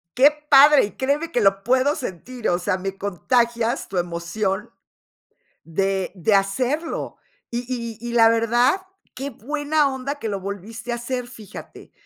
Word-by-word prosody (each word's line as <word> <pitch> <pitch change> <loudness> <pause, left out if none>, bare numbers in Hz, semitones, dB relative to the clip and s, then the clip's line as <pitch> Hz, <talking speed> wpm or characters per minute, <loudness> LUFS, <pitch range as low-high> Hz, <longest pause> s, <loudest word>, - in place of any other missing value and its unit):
Qué 280 +4 +7 0.2
padre, 285 -2 +8
y 205 - -8
créeme 290 +5 -1
que 240 - +2
lo 195 -1 +3
puedo 260 +5 +3
sentir, 240 +3 -5
o 175 - +2
sea, 185 +1 -1
me 195 +1 -5
contagias 235 +4 0
tu 190 - -4
emoción 185 +5 -2 0.9
de 190 +3 -1
de 195 +3 +1
hacerlo. 250 +12 -1 0.3
Y 240 - -1
y 235 -3 -4
y 240 0 -5
la 225 -1 +6
verdad, 240 - +2 0.3
qué 275 +2 -5
buena 290 +3 0
onda 265 +2 -4
que 255 -6 -5
lo 200 -2 -2
volviste 205 +5 -6
a 235 - 0
hacer, 245 +1 -4
fíjate. 220 -4 -12
235 Hz, 155 wpm, -22 LUFS, 195-260 Hz, 0.9 s, padre